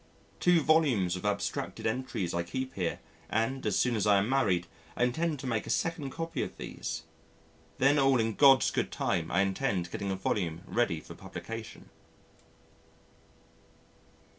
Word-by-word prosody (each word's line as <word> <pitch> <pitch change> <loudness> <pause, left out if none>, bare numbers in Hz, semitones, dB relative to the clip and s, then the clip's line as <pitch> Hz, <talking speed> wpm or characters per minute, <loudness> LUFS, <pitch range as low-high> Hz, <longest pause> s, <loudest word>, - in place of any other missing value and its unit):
Two 175 -2 +4
volumes 140 - +3
of 90 - -6
abstracted 100 0 -2
entries 110 -5 -2
I 85 - 0
keep 130 +10 -4
here, 90 -3 -2 0.3
and, 120 +5 0
as - - +1
soon 125 -2 +2
as 105 -1 0
I 100 -1 +6
am 100 +2 +1
married, 100 -10 +2 0.3
I - - +2
intend 155 +6 0
to - - -7
make 115 -4 -1
a - - -6
second 165 -4 -1
copy 165 +4 -4
of - - -5
these.... 80 0 -5 0.7
Then 140 +2 +4
all 135 -2 +4
in 110 0 +1
God's 135 -1 +6
good - - -1
time 80 -2 -1
I 95 - +2
intend 95 -2 -1
getting 100 - -3
a 95 - 0
volume 90 -3 -2
ready 100 -10 0
for - - -11
publication. 115 -1 -8
115 Hz, 160 wpm, -30 LUFS, 95-135 Hz, 0.7 s, I